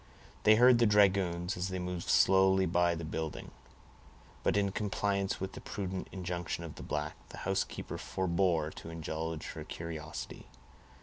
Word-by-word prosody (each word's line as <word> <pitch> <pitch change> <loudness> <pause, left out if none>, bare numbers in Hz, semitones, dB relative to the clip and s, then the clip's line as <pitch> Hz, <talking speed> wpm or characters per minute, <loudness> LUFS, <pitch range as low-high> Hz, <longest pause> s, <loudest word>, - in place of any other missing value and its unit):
They 110 - +8
heard 125 +1 +7
the 120 - +5
dragoons, 95 -4 +3
as 90 +1 -2
they 95 -1 -3
moved 90 -1 -4
slowly 95 0 +5
by 85 0 +2
the 80 0 -5
building; 80 0 -4 0.9
but - - +2
in 100 -1 +2
compliance 100 -1 -1
with 95 0 -3
the - - -9
prudent 95 -2 -4
injunction 90 -2 -4
of 80 - -7
the - - -10
black, 75 +1 -3
the - - -10
housekeeper - - -2
forbore 85 -4 0
to - - -8
indulge 80 -1 -4
her - - -7
curiosity. 80 -2 -7
90 Hz, 150 wpm, -32 LUFS, 85-95 Hz, 0.9 s, They